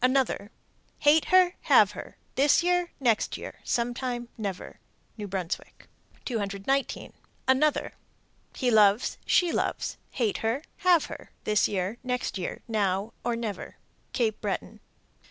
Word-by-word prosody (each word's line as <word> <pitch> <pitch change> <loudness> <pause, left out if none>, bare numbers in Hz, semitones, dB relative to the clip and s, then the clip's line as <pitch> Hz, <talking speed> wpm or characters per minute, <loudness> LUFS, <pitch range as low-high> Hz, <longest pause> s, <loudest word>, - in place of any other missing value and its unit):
Another: 255 -5 +2 0.5
Hate 300 +2 +5
her, 370 -1 +5 0.2
Have - - +7
her, - - -9 0.2
This 285 +5 +4
year, 355 0 +1
Next 235 -5 +1
year, - - -9
Sometime, 240 0 -2
Never. 200 -4 -5 0.4
New 210 -2 -6
Brunswick. 185 -2 -5 0.4
219. 220 +4 -2 0.3
Another: 280 +3 +2 0.6
He 250 -2 +1
loves, 210 0 +4
She 355 -2 +4
loves, - - -1
Hate 230 -5 0
her, 230 +6 -1
Have 355 -4 +4
her, - - -9
This 210 -1 +3
year, 195 +4 -2
Next 250 -5 -2
year, 180 - -5
Now 205 -1 0
or 240 - 0
never. 220 -4 -5 0.4
_Cape 225 -4 0
Breton. - - -3
240 Hz, 125 wpm, -27 LUFS, 205-275 Hz, 0.6 s, Have